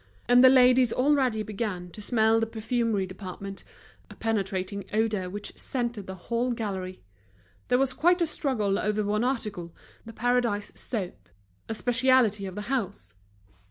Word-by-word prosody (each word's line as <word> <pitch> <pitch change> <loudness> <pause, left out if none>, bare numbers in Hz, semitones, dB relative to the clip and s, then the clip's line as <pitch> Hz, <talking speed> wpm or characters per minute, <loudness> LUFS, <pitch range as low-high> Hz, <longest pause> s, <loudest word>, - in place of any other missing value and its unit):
And 245 +1 +6
the 260 - +10
ladies 250 -2 +5
already 255 -5 +2
began 200 -5 -4
to 210 - -10
smell 220 0 +3
the 225 - 0
perfumery 225 -2 -1
department, 195 +1 -8 0.5
a - - -12
penetrating 200 -2 -2
odor 215 -4 0
which 205 +2 -7
scented 235 -6 -3
the 190 - -6
whole 235 +6 -1
gallery. 190 -5 -5 0.6
There 250 - +3
was 265 0 +1
quite 350 +5 +3
a 340 - +3
struggle 235 -10 0
over 210 0 0
one 210 +2 0
article, 210 -10 -3 0.3
The 225 - -9
Paradise 235 -3 0
soap, 180 - -5 0.4
a 225 - -2
specialty 235 -4 +2
of 185 - -8
the 210 - -4
house. 210 -4 -3
220 Hz, 150 wpm, -27 LUFS, 200-245 Hz, 0.6 s, the